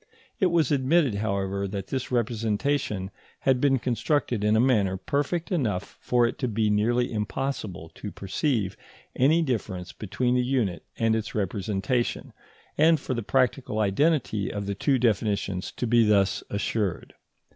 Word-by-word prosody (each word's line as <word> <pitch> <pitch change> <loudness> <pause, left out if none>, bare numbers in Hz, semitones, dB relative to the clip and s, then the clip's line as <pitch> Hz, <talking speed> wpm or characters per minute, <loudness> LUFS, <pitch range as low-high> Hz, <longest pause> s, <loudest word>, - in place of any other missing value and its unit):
It 190 - +4
was 170 -3 +2
admitted, 140 -1 +3
however, 100 -1 -1
that 95 -1 -5
this 130 -2 -3
representation 115 -2 -1 0.3
had 130 -2 +2
been 135 -2 +4
constructed 125 -2 0
in 105 +1 +3
a - - +4
manner 105 -7 +2
perfect 145 - -2
enough 110 - -2
for 120 -1 +3
it 115 - -3
to 130 - 0
be 110 -1 +1
nearly 120 +4 +1
impossible 105 -5 -3
to - - -7
perceive 100 0 -1 0.4
any 155 +6 +4
difference 95 - -3
between 125 +4 -1
the 125 0 +2
unit 120 -10 0
and 115 -1 +2
its 110 -1 -4
representation, 105 +4 -1 0.5
and 160 0 +5
for 130 - -3
the 120 - -2
practical 125 0 0
identity 110 - +1
of 100 -1 -4
the 100 - -2
two 135 +7 +1
definitions 100 -5 0
to - - -3
be 120 0 +4
thus 100 -2 +2
assured. 100 -2 -2
115 Hz, 150 wpm, -26 LUFS, 100-130 Hz, 0.5 s, and